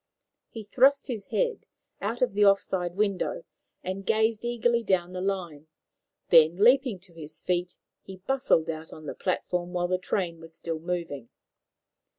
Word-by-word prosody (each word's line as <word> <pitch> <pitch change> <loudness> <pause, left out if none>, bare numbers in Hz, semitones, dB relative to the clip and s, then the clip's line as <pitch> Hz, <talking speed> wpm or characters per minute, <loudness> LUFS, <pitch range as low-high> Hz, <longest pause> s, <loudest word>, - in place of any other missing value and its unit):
He 225 - -8
thrust 265 +7 +3
his 225 -7 -5
head 485 -2 -1 0.3
out 225 +5 -1
of 250 - +1
the 205 +1 +3
off 200 -1 +6
side 175 -2 -3
window, 210 - -1 0.4
and 190 +2 -4
gazed 220 +1 +1
eagerly 240 0 +1
down 185 -4 0
the 180 - -4
line; 175 -6 -3 0.6
then, 165 -1 +6
leaping 245 +1 +4
to 180 -2 -16
his 155 -1 -10
feet, 180 0 -1 0.2
he 190 - -10
bustled 190 -6 +1
out 160 0 -8
on 155 - -11
to 150 - -5
the - - -7
platform 180 -1 -2
while 175 0 0
the 185 0 +1
train 175 -3 -2
was 165 0 -12
still 165 -1 -4
moving. 165 -7 -4
185 Hz, 165 wpm, -27 LUFS, 170-220 Hz, 0.6 s, off